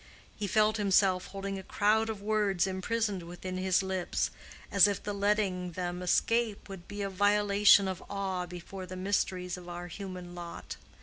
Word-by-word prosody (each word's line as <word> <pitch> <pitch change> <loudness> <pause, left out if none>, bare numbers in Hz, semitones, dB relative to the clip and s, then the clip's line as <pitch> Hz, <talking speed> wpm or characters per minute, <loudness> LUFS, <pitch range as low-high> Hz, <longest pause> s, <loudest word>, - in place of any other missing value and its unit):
He 205 - -3
felt 215 +2 +3
himself 195 -2 +3
holding 195 0 -5
a - - -6
crowd 215 +3 +2
of 210 -2 -5
words 205 -4 +2
imprisoned 195 +1 -1
within 175 +2 -6
his 185 +1 +2
lips, 190 -2 -1 0.4
as 200 0 +7
if 200 -2 -2
the 205 - -3
letting 200 -3 0
them 180 0 -3
escape 225 +4 +1
would 190 -3 -9
be 205 0 -5
a - - -1
violation 205 0 +5
of 185 -1 -4
awe 190 -3 -2
before 180 +2 -8
the 185 - -7
mysteries 185 -1 -1
of 175 -1 -10
our 175 0 -6
human 180 -1 -7
lot. 175 -1 -7
195 Hz, 170 wpm, -30 LUFS, 180-205 Hz, 0.4 s, as